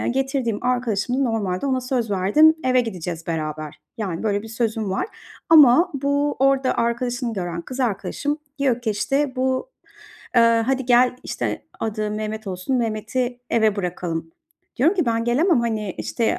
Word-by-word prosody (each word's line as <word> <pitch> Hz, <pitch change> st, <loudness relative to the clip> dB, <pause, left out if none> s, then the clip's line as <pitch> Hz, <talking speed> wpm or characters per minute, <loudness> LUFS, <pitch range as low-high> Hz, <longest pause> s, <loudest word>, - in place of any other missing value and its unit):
yani, -, -, -1 dB
getirdiğim 265 Hz, -5 st, -1 dB
arkadaşımı 250 Hz, +1 st, 0 dB
normalde 210 Hz, -2 st, -1 dB
ona 260 Hz, -1 st, +1 dB
söz 250 Hz, -3 st, -2 dB
verdim, 205 Hz, +12 st, +5 dB
eve 255 Hz, -1 st, +4 dB
gideceğiz 175 Hz, -7 st, -5 dB
beraber, 155 Hz, -2 st, -4 dB, 0.2 s
yani, 185 Hz, -6 st, -3 dB
böyle 205 Hz, -2 st, 0 dB
bir 225 Hz, -, -9 dB
sözüm 225 Hz, -3 st, -2 dB
var 190 Hz, -, -1 dB, 0.4 s
ama 320 Hz, +2 st, +7 dB
bu 285 Hz, +1 st, 0 dB
orada 270 Hz, 0 st, +3 dB
arkadaşını 240 Hz, +1 st, -1 dB
gören 175 Hz, -4 st, -3 dB
kız 255 Hz, +6 st, -6 dB
arkadaşım 250 Hz, +6 st, -1 dB, 0.2 s
diyor 255 Hz, -3 st, +1 dB
ki 225 Hz, -3 st, -1 dB
işte 270 Hz, +6 st, -1 dB
bu, 260 Hz, -, -1 dB, 0.7 s
ııı, 230 Hz, 0 st, +5 dB
"Hadi 265 Hz, +2 st, 0 dB
gel" 250 Hz, 0 st, +4 dB
işte, -, -, -3 dB, 0.2 s
adı 215 Hz, -1 st, -2 dB
Mehmet 215 Hz, 0 st, -4 dB
olsun, 185 Hz, +8 st, -2 dB
"Mehmet'i 240 Hz, +2 st, -2 dB
eve 220 Hz, -2 st, +2 dB
bırakalım." 175 Hz, -3 st, -3 dB, 0.5 s
Diyorum 315 Hz, +10 st, +3 dB
ki, 345 Hz, -, +1 dB
"Ben 230 Hz, 0 st, +1 dB
gelemem, 275 Hz, +5 st, +3 dB
hani, 215 Hz, -5 st, -2 dB
işte, 230 Hz, -, -1 dB
235 Hz, 155 wpm, -22 LUFS, 205-260 Hz, 0.7 s, ama